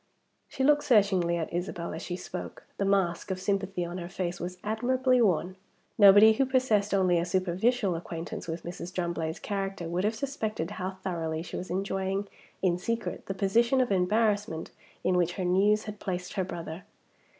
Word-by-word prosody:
She 265 - -3
looked 295 +1 +4
searchingly 195 -7 +3
at 165 0 -4
Isabel 175 -1 -3
as 160 - -5
she 175 - -4
spoke. - - -7 0.2
The 200 - +1
mask 190 -3 +1
of 185 -1 -2
sympathy 195 -2 -1
on 175 +2 -5
her 170 0 -6
face 180 -2 -3
was 180 +1 -5
admirably 250 +4 +2
worn. 185 -2 +1 0.4
Nobody 205 +2 +8
who 270 +5 +2
possessed 240 -6 +2
only 185 -3 +3
a - - 0
superficial 185 +4 +1
acquaintance 165 0 -6
with 165 0 -4
Mrs. 175 0 -6
Drumblade's 170 -3 -2
character 195 -3 -3
would 175 +2 -1
have 215 +2 +1
suspected 220 - -3
how 190 -1 -4
thoroughly 165 -3 -2
she - - -8
was 185 - -5
enjoying 195 +1 -1 0.4
in 180 -2 +2
secret 230 +4 -3
the 195 - -3
position 235 +7 +3
of 250 -4 +1
embarrassment 200 -2 +1 0.3
in 185 - +2
which 175 0 +1
her 185 -1 -3
news 205 +4 +3
had 210 -1 -7
placed 180 -2 -4
her 190 - 0
brother. 170 -1 -7
190 Hz, 175 wpm, -28 LUFS, 175-210 Hz, 0.4 s, Nobody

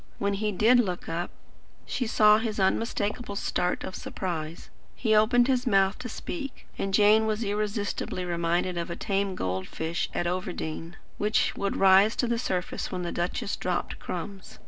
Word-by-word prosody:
When 200 0 0
he 210 +1 -1
did 225 +6 +5
look 185 -7 -1
up, 170 +2 -2 0.6
she 245 - -2
saw 215 -1 +6
his 220 -2 -3
unmistakable 205 +2 0
start 180 -2 -1
of 190 - -5
surprise. 165 -3 -5 0.2
He 220 -3 +1
opened 240 +3 +5
his 255 -1 +1
mouth 195 -2 +3
to 245 - -6
speak, 275 +3 -6
and 195 - -2
Jane 215 +2 +5
was 215 +1 -1
irresistibly 205 -3 -2
reminded 175 +1 0
of 170 - -4
a 170 - -3
tame 195 -1 -1
goldfish 95 - -3
at 175 - 0
Overdene, 175 -2 -3 0.2
which 215 +1 +2
used 200 0 -1
to - - -4
rise 195 +3 +6
to - - +1
the 235 0 0
surface 185 -6 -2
when 180 -1 -3
the 175 - -3
duchess 175 +3 -2
dropped 180 -1 -2
crumbs. 190 +2 -6
195 Hz, 170 wpm, -27 LUFS, 180-215 Hz, 0.6 s, saw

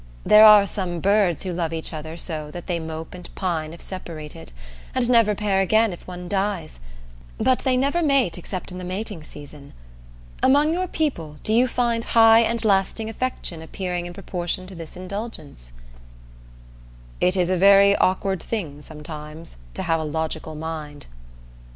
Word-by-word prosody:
There 215 +1 +8
are 210 -2 +9
some 185 -4 -4
birds 195 -3 +2
who 185 -2 -3
love 170 -2 -2
each 165 +1 -4
other 160 +1 -7
so 155 -3 -4
that 175 +3 -8
they 175 -2 -2
mope 160 0 -7
and 180 -1 -10
pine 165 -4 -2
if 170 - -11
separated, 155 - -8 0.4
and 255 -2 +2
never 230 -4 +4
pair 200 -2 +1
again 220 +2 +3
if 175 - -12
one 180 -1 -7
dies, 195 - -2 0.6
but 255 - +2
they 255 -1 +1
never 280 +6 +1
mate 275 - +2
except 185 +1 -5
in 180 - -7
the - - -7
mating 185 -1 -5
season. 145 -2 -12 0.7
Among 290 +4 +4
your 365 +2 -1
people 170 - -3
do 215 - +1
you 245 +3 +4
find 235 -1 0
high 225 -1 +6
and 230 0 +1
lasting 205 +2 +1
affection 225 -9 -3
appearing 175 +1 -4
in 175 - -8
proportion 180 -1 -4
to 190 - -9
this 165 -1 -9
indulgence?" 185 - -7 1.5
It 180 +1 +2
is 180 0 +1
a - - +3
very 200 +2 +6
awkward 190 0 +1
thing, 160 -10 -4
sometimes, 150 - -8 0.2
to - - -2
have 165 0 +1
a - - -3
logical 160 0 -3
mind. 150 -2 -6
185 Hz, 165 wpm, -23 LUFS, 160-215 Hz, 1.5 s, are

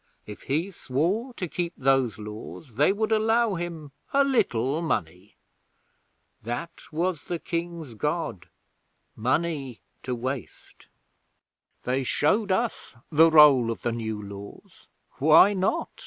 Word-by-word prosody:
If 105 - -10
he 165 +8 0
swore 185 - -2
to 180 - -4
keep 170 +1 -3
those 130 -4 +2
Laws, 105 +4 -9
they 150 +6 +4
would 215 +2 -1
allow 225 0 +2
him 165 -4 -5 0.2
a 280 0 +4
little 155 - +1
money. 90 - -3 1.1
That 120 +9 -6
was 165 0 -2
the 175 - -3
King's 170 -5 -5
God 150 - -3 0.7
Money 135 - -1 0.2
to 125 0 -3
waste. 130 +2 -7 1.0
They 130 +2 0
showed 195 - +1
us 225 - -2 0.2
the 160 +2 +6
roll 145 -7 +7
of 115 - -4
the 120 - 0
New 110 -2 -4
Laws. 100 0 -11 0.3
Why 155 +8 +7
not? 190 -1 -1
150 Hz, 125 wpm, -26 LUFS, 120-180 Hz, 1.1 s, roll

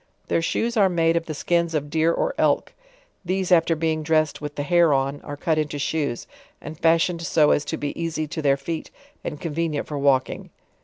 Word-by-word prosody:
Their - - +2
shoes 230 +8 -1
are 195 -3 +5
made 165 -2 +2
of 170 0 -1
the 155 - -4
skins 170 +1 0
of 145 -1 -2
deer 160 +1 +2
or - - -1
elk; - - +1 0.5
these 185 +1 -2
after 165 -1 +4
being 160 0 -1
dressed 155 -1 +1
with 150 0 -6
the 145 - -2
hair 170 -1 +4
on, 135 +1 -1
are 145 -1 -7
cut 160 +1 0
into 150 -1 -2
shoes, 140 -4 -2 0.3
and 155 - -8
faishioned 165 +2 +2
so 160 -3 +3
as 145 - +2
to 160 - -3
be 145 - -3
easy 160 -2 -2
to 160 - -4
their 140 -2 +3
feet 160 +3 -5 0.3
and 150 - -5
convenient 160 -1 -2
for 145 -2 -5
walking. 135 -2 +1
160 Hz, 205 wpm, -23 LUFS, 145-170 Hz, 0.5 s, are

